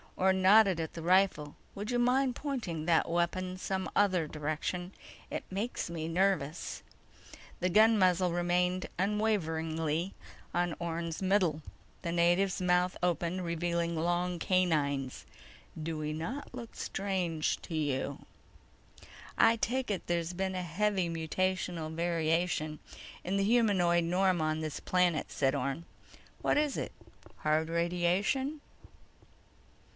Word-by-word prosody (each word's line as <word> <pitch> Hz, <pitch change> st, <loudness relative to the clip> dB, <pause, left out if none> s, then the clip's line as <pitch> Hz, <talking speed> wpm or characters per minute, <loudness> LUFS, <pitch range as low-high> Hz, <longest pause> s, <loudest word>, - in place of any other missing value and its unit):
Orne 190 Hz, 0 st, +3 dB
nodded 195 Hz, -2 st, +6 dB
at 160 Hz, -1 st, -3 dB
the 165 Hz, -, -6 dB
rifle. 180 Hz, -5 st, +2 dB, 0.2 s
"Would 205 Hz, +2 st, -5 dB
you 245 Hz, -, +1 dB
mind 250 Hz, +1 st, +2 dB
pointing 225 Hz, -, -3 dB
that 165 Hz, -1 st, +3 dB
weapon 180 Hz, +2 st, -1 dB
some 190 Hz, 0 st, -2 dB
other 185 Hz, -6 st, +3 dB
direction? 155 Hz, +5 st, -3 dB, 0.4 s
It -, -, -4 dB
makes 205 Hz, +1 st, -3 dB
me 160 Hz, -1 st, -4 dB
nervous." 175 Hz, -3 st, 0 dB, 0.8 s
The 180 Hz, -, +1 dB
gun 220 Hz, +4 st, +6 dB
muzzle 180 Hz, -1 st, +3 dB
remained 180 Hz, +1 st, +1 dB
unwaveringly 165 Hz, -5 st, 0 dB, 0.4 s
on 175 Hz, -2 st, 0 dB
Orne's 170 Hz, 0 st, -3 dB
middle. 185 Hz, -5 st, +2 dB, 0.4 s
The 170 Hz, -, -2 dB
native's 175 Hz, +3 st, +2 dB
mouth 180 Hz, 0 st, +2 dB
opened, 175 Hz, +1 st, 0 dB
revealing 170 Hz, 0 st, -1 dB
long 175 Hz, +2 st, 0 dB
canines. 150 Hz, -8 st, 0 dB, 0.6 s
"Do 160 Hz, 0 st, -3 dB
we 150 Hz, 0 st, -3 dB
not 235 Hz, -, -5 dB
look 240 Hz, -2 st, -8 dB
strange 180 Hz, -5 st, -1 dB
to 165 Hz, -, -6 dB
you?" 140 Hz, -2 st, -2 dB, 1.1 s
"I 225 Hz, -, +6 dB
take 250 Hz, +3 st, -1 dB
it 195 Hz, -, -3 dB
there's 170 Hz, 0 st, -1 dB
been 190 Hz, +1 st, -2 dB
a 180 Hz, -, -2 dB
heavy 185 Hz, +1 st, 0 dB
mutational 165 Hz, 0 st, -2 dB
variation 165 Hz, -2 st, 0 dB, 0.4 s
in 190 Hz, +3 st, -1 dB
the 195 Hz, -, +2 dB
humanoid 195 Hz, -6 st, +3 dB
norm 180 Hz, +1 st, +2 dB
on 155 Hz, 0 st, 0 dB
this 155 Hz, -2 st, -4 dB
planet," 180 Hz, -3 st, +1 dB
said 135 Hz, -1 st, +1 dB
Orne. 140 Hz, +4 st, -2 dB, 0.6 s
"What -, -, +2 dB
is 295 Hz, -2 st, +1 dB
it? -, -, -3 dB, 0.5 s
Hard 155 Hz, +1 st, +1 dB
radiation?" 180 Hz, -, 0 dB
175 Hz, 125 wpm, -31 LUFS, 165-190 Hz, 1.1 s, nodded